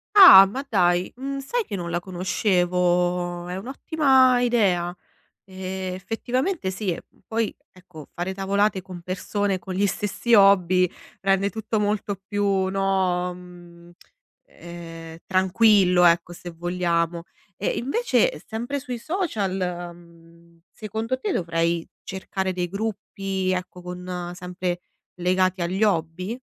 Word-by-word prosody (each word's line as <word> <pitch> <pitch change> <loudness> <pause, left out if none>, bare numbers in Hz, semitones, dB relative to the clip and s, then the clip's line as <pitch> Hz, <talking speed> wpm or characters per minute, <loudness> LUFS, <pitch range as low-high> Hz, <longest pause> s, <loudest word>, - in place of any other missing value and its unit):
Ah, 360 - +11
ma 255 +8 -5
dai, 180 -4 +2
mhmm 275 +2 -4
sai 460 - -2
che 205 - -5
non 175 -3 -4
la 175 +1 -1
conoscevo? 180 -1 0
È 180 - -4
un'ottima 265 +2 +3
idea. 190 -8 +1 0.5
E, 190 0 -5
effettivamente 245 - -2
sì. 190 -3 -3 0.3
Poi, 225 -1 -1 0.2
ecco, 180 -5 -14
fare 180 +2 -4
tavolate 195 0 0
con 180 -2 -10
persone 190 +2 -2
con 185 0 -7
gli 200 +2 +2
stessi 205 +4 -1
hobby, 185 -3 +5 0.3
rende 195 +1 +2
tutto 220 0 -2
molto 205 -1 -1
più, 205 0 -1 0.3
no, 190 -2 0
mhmm, 175 -1 -14 0.6
ehm, 165 -1 -10
tranquillo, 190 -1 +4
ecco, 170 0 +3
se 175 0 -9
vogliamo. 170 0 -1 0.3
E 200 - -3
invece 475 - +1
sempre 240 +6 -3
sui 255 -3 -5
social, 230 - -2 0.3
mhmm, 170 0 -20
secondo 220 +4 -4
te 215 - -2
dovrei 165 -1 0 0.2
cercare 190 0 -3
dei 180 -1 -2
gruppi, 195 -1 -3
ecco, 180 -1 -4
con 180 0 -6
sempre 180 0 -4 0.4
legati 185 +1 +1
agli 185 +5 0
hobby? 180 +1 0
185 Hz, 120 wpm, -24 LUFS, 175-210 Hz, 0.6 s, Ah